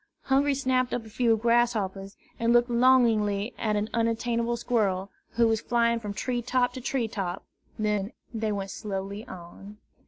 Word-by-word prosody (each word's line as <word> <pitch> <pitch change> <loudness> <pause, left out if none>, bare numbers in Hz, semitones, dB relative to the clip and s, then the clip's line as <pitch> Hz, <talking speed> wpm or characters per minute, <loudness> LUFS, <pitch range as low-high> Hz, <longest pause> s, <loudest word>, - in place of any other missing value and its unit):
Hungry 275 +1 +2
snapped 255 -2 +1
up 235 -2 -4
a 220 - -12
few 230 -1 +2
grasshoppers, 215 -4 0 0.2
and 230 0 +2
looked 240 +1 +4
longingly 235 -4 +3
at 215 -1 0
an 210 +1 0
unattainable 230 +1 0
squirrel, 200 -5 0 0.2
who 235 -1 +3
was 225 -1 +1
flying 235 -1 +1
from 210 -2 -6
tree 245 +3 -2
top 245 0 +1
to 255 - -7
tree 245 -2 -1
top; 195 -4 -4 0.3
then 210 -1 -1 0.2
they 220 -1 -1
went 195 -1 -3
slowly 200 +1 -5
on. 185 +4 -11
230 Hz, 160 wpm, -27 LUFS, 205-240 Hz, 0.3 s, looked